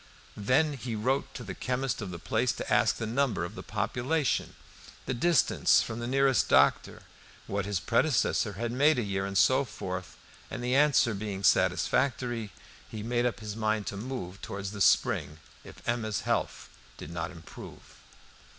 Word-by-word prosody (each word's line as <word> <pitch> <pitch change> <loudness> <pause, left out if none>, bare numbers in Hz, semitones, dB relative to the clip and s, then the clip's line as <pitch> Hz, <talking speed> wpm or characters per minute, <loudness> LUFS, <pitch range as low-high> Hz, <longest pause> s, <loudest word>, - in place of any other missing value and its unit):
Then 135 +9 +2
he 125 -3 -5
wrote 130 +6 0
to 125 - -6
the 95 -4 -6
chemist 125 +2 -2
of 100 - -5
the 90 - -6
place 115 +8 0
to - - -3
ask - - +3
the 115 - -4
number 120 -5 0
of 85 - -8
the - - -8
population, 135 +2 -1 0.5
the - - -2
distance 150 +3 +3
from 110 - -5
the 120 - -4
nearest 135 0 +2
doctor, - - +3 0.4
what 100 0 -3
his 100 -4 -1
predecessor 75 - +1
had 115 +2 -3
made 145 +4 +3
a 120 - 0
year, 95 -1 -2
and 100 0 -2
so 130 +7 +4
forth; 95 -6 -6 0.3
and 120 - -6
the 125 +1 0
answer 140 -5 +4
being 100 -1 -5
satisfactory, 120 +1 +1 0.4
he 110 -1 -6
made 120 +1 +1
up 120 -1 -4
his 105 -1 -5
mind 110 -1 0
to - - -4
move 100 -4 -6
towards 100 0 -5
the 100 -1 -7
spring, 75 -4 +2 0.3
if - - -14
Emma's 110 -3 -1
health - - -2 0.3
did 75 - -9
not 85 0 -3
improve. 85 -2 -12
115 Hz, 170 wpm, -29 LUFS, 100-130 Hz, 0.5 s, so